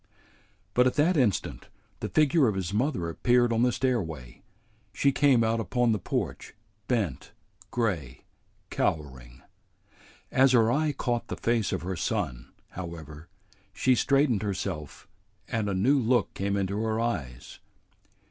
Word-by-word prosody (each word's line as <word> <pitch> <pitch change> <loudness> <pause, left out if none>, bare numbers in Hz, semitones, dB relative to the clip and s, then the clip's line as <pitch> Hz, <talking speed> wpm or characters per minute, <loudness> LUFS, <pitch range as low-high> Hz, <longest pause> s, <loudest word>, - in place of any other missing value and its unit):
But 125 +2 +4
at 125 - 0
that 165 +5 +3
instant 125 - 0 0.3
the - - -4
figure 155 -2 +3
of 105 - 0
his 95 0 -3
mother 110 - 0
appeared 120 +7 +2
on 115 - +1
the 125 0 +3
stairway. 80 - -2 0.5
She 140 - +2
came 135 -4 +4
out 115 +1 +1
upon 120 +3 +1
the 105 - 0
porch, - - -4 0.3
bent, 105 - -2 0.4
gray, 90 - -2 0.5
cowering. 65 -4 -3 0.9
As 130 0 +4
her 115 -2 +4
eye 150 +3 +1
caught 120 -4 -2
the - - -5
face 115 -4 0
of - - -3
her 95 +1 -3
son, - - -3 0.2
however, 80 -3 -9 0.4
she 130 - +2
straightened 135 -3 +2
herself 95 -7 -4 0.4
and 110 -4 -1
a - - -1
new 130 +10 +3
look 120 -2 +1
came 100 +1 -1
into 100 +2 -1
her 110 0 -1
eyes. 70 - -4
110 Hz, 140 wpm, -27 LUFS, 85-125 Hz, 0.9 s, But